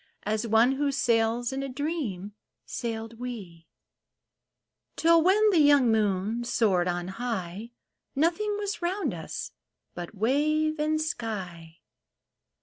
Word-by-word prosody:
As 215 +2 -1
one 225 +3 +4
who 285 0 +1
sails 235 -1 +1
in 270 - -2
a 275 - -4
dream, 255 - -3 0.3
sailed 225 -1 -5
we, 195 -10 -7 1.3
Till, 335 0 +5
when 415 +5 +4
the 350 - +4
young 285 -5 +5
moon 215 +1 0
soared 200 -7 +2
on 175 0 -2
high, 210 -1 -4 0.5
Nothing 350 +8 +1
was 405 -4 -3
round 350 - -1
us 160 -2 -6 0.4
but 175 +4 -7
wave 305 +8 +1
and 310 +1 +1
sky. 185 - -5
235 Hz, 120 wpm, -27 LUFS, 205-305 Hz, 1.3 s, Till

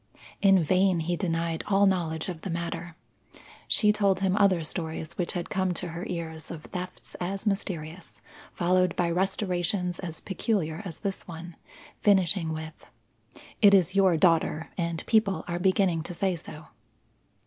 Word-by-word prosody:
In 195 -3 +5
vain 185 +1 +3
he 175 +2 -1
denied 165 -2 -1
all 200 0 +4
knowledge 170 -5 0
of 175 -4 -5
the 195 - -5
matter. 170 0 -4 0.7
She 210 -1 +4
told 200 -3 +2
him 190 -1 +2
other 195 -5 +3
stories 160 0 -4
which 175 - -2
had 175 -2 -4
come 185 -2 0
to 180 +1 -4
her 170 +2 -5
ears 160 -2 -5
of 155 -2 -7
thefts 180 0 -7
as 195 +3 -3
mysterious, 180 -4 -3 0.3
followed 180 0 +2
by 170 -1 +1
restorations 180 -1 0
as 170 -4 -5
peculiar 185 -4 -2
as 165 -4 -7
this 195 -1 -3
one, 170 0 -8 0.5
finishing 185 -4 +3
with, 160 0 -5 0.9
"It 200 -1 +8
is 185 -1 +3
your 190 -4 +4
daughter, 160 -2 +2
and 170 -2 -3
people 215 -4 +2
are 175 -1 -2
beginning 185 -2 +2
to 175 +2 -7
say 190 0 0
so." 155 -1 -10
180 Hz, 155 wpm, -27 LUFS, 165-190 Hz, 0.9 s, It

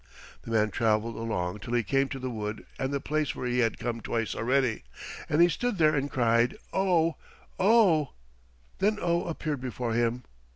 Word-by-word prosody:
The - - -11
man 110 -2 +2
travelled 110 +1 +1
along 105 -4 -3
till 120 +3 -3
he 120 - +2
came 135 +3 +1
to 135 - -5
the 130 -1 -4
wood 105 -1 -5
and 135 0 -1
the 140 - -1
place 150 +2 -1
where - - -5
he 125 0 0
had 115 -3 +1
come 115 -1 -3
twice 115 0 -2
already, 125 -1 +1 0.5
and 155 +3 +5
he - - +7
stood 210 +6 -1
there 155 -2 +4
and 140 -1 0
cried, 120 -1 +2 0.2
"Oh! 170 -4 +2 0.4
Oh!" 190 - +4 0.7
Then 210 +2 +2
Oh 170 0 0
appeared 155 -4 -3
before 125 -2 -3
him. 120 +1 0
125 Hz, 180 wpm, -28 LUFS, 115-155 Hz, 0.7 s, he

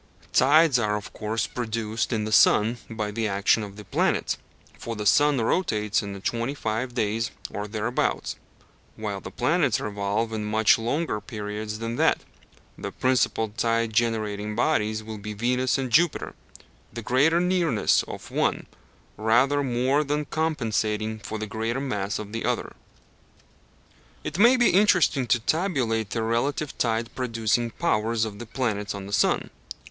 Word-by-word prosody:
Tides 145 -1 +5
are 105 -3 0
of 105 -1 -6
course 110 0 -2
produced 115 -1 -3
in 110 -3 0
the 110 - -4
sun 110 +2 +4
by 110 -2 -3
the 110 +1 -1
action 100 +2 +2
of 100 -2 -7
the 105 0 -10
planets, - - 0 0.4
for 115 - -5
the 105 -1 -5
sun 145 +7 +4
rotates 110 - +1
in 100 -1 -6
twenty 120 +4 -1
five 120 0 -3
days 110 0 0 0.2
or 105 +1 -4
thereabouts, 110 +3 -1 0.6
while 105 -3 -4
the - - -7
planets 150 -7 +1
revolve 105 +2 -2
in 110 -1 -2
much 110 +1 +3
longer 115 -1 -1
periods 105 -1 -5
than 115 +1 -4
that. - - +2 0.6
The - - -5
principal 125 -3 +1
tide 115 0 0
generating 105 -2 -1
bodies 110 -5 +1
will 110 -1 -7
be 105 +1 -6
Venus 125 +4 +1
and 130 -2 -3
Jupiter; 170 +3 +2 0.6
the - - -7
greater 145 +7 +3
nearness 175 - +2
of - - -8
one - - 0 0.5
rather 120 +6 +3
more 130 +3 +1
than 150 +1 -1
compensating 110 -8 -1
for 105 +1 -5
the 110 - -4
greater 115 +4 -2
mass 105 -7 -2
of 105 -1 -7
the 115 +1 -4
other. - - -2 1.5
It 175 - -4
may 240 +4 +7
be 240 - +4
interesting 185 -9 +3
to 120 - +3
tabulate 120 - 0
the 115 0 -2
relative 135 +6 -1
tide 115 0 0
producing 115 -1 0
powers 115 -6 0
of 105 -2 -7
the 120 - -8
planets 105 -5 -2
on 100 -1 -6
the 100 - -8
sun. - - +1
115 Hz, 155 wpm, -25 LUFS, 105-130 Hz, 1.5 s, may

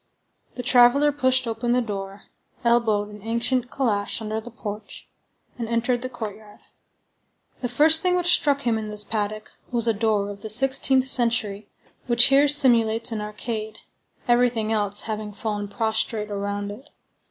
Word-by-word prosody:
The 245 - -6
traveller 250 +4 +4
pushed 260 -2 +1
open 230 +1 -2
the 250 - +2
door, 195 -3 -7 0.4
elbowed 225 -3 +1
an 210 0 -12
ancient 235 +3 -1
calash 215 -7 -2
under 220 0 -4
the 240 - -11
porch, 215 -2 -9 0.5
and 230 -1 -4
entered 240 +1 -1
the 255 - -5
courtyard. 215 -3 -9 1.0
The 245 - -4
first 310 +6 +4
thing 360 -1 +1
which 355 0 +4
struck 285 -4 +2
him 235 -4 0
in 215 -1 -6
this 210 0 -2
paddock 215 0 -4 0.2
was 235 -1 +1
a 230 - +3
door 210 -2 -1
of 200 0 -9
the 220 - -6
sixteenth 265 +2 +4
century, 225 -5 +1 0.4
which 235 -1 +6
here 280 +2 +5
simulates 235 -5 +3
an 220 -2 -4
arcade, 215 +1 -5 0.5
everything 240 -2 +1
else 205 -1 0
having 215 -1 -5
fallen 205 -1 -4
prostrate 220 0 -2
around 200 0 -4
it. 260 +9 -13
225 Hz, 155 wpm, -23 LUFS, 210-245 Hz, 1.0 s, which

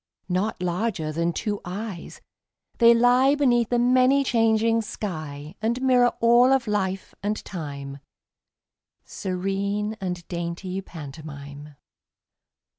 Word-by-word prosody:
Not 185 +4 -1
larger 180 -3 -1
than 170 +2 0
two 205 +4 -3
eyes, 190 0 -7 0.6
they 235 -1 +8
lie 245 +4 +4
Beneath 240 -5 +2
the 245 - +2
many 255 +3 +4
changing 225 -2 +2
sky 155 -9 -6
And 230 +3 0
mirror 250 -2 +4
all 240 +2 +5
of 265 -2 +1
life 195 -2 -2
and 210 +1 -1
time, 140 -5 -7 1.1
Serene 200 +3 -2
and 180 -2 -4
dainty 175 +2 -4
pantomime. 145 -3 -10
200 Hz, 110 wpm, -24 LUFS, 170-235 Hz, 1.1 s, they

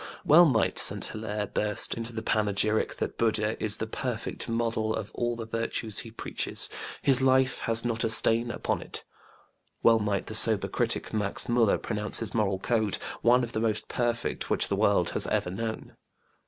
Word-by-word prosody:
Well 170 +4 +7
might 145 - +1
St. - - +4
Hilaire 105 -1 -4
burst 105 +1 0
into 115 0 -2
the 110 -1 -6
panegyric 105 0 +1
that - - -5
BudĖĢdĖĢha 110 -1 0
"is 105 -1 +3
the 110 - -3
perfect 115 0 -5
model 115 -1 -1
of 105 - -6
all 120 0 -2
the 115 -1 -6
virtues 115 -1 -3
he 115 - -6
preaches... 110 - -1 0.3
his 135 -2 +5
life 130 0 +2
has 115 +1 +2
not 115 -1 -1
a 115 - 0
stain 115 +1 +3
upon - - -3
it". - - -7 0.8
Well 115 -1 +5
might 105 -2 -2
the - - -8
sober - - +6
critic - - -2
Max 105 -2 -1
MÃžller 120 -3 +2
pronounce 105 -1 -3
his 115 -3 -5
moral 100 -4 0
code 110 0 -1 0.3
"one 125 +1 +4
of 120 - -5
the 110 - -3
most 110 -2 -1
perfect 120 -1 -2
which - - 0
the - - 0
world - - +1
has - - -1
ever 90 - -1
known". 110 +3 -6
115 Hz, 180 wpm, -27 LUFS, 105-120 Hz, 0.8 s, Well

